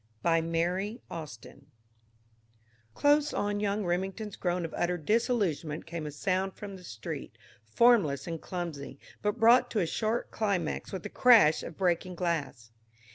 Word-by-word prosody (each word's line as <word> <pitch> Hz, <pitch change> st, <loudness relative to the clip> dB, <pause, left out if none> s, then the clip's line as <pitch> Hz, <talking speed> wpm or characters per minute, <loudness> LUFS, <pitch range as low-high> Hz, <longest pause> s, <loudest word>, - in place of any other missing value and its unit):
BY 165 Hz, -1 st, +3 dB
MARY 175 Hz, +7 st, -1 dB
AUSTIN 140 Hz, -3 st, -9 dB, 1.3 s
Close 290 Hz, +1 st, +3 dB
on 205 Hz, 0 st, -1 dB
Young 205 Hz, 0 st, -1 dB
Remington's 190 Hz, +4 st, -2 dB
groan 175 Hz, -1 st, -1 dB
of 165 Hz, -, -7 dB
utter 175 Hz, +1 st, 0 dB
disillusionment 175 Hz, -, 0 dB
came 165 Hz, -2 st, -5 dB
a -, -, -5 dB
sound 190 Hz, +5 st, -1 dB
from 200 Hz, -2 st, -8 dB
the 185 Hz, -, -12 dB
street, 110 Hz, -10 st, -7 dB, 0.3 s
formless 155 Hz, -, +3 dB
and 165 Hz, -2 st, -5 dB
clumsy, 165 Hz, -7 st, -5 dB, 0.2 s
but 210 Hz, +3 st, -1 dB
brought 245 Hz, +2 st, +6 dB
to 220 Hz, -, -1 dB
a 180 Hz, -, +2 dB
sharp 220 Hz, +7 st, -2 dB
climax 195 Hz, -7 st, -1 dB
with 190 Hz, -3 st, -5 dB
the -, -, -5 dB
crash 225 Hz, -11 st, +6 dB
of 165 Hz, -, -8 dB
breaking 180 Hz, -1 st, 0 dB
glass. 160 Hz, -10 st, -3 dB
180 Hz, 145 wpm, -29 LUFS, 160-210 Hz, 1.3 s, brought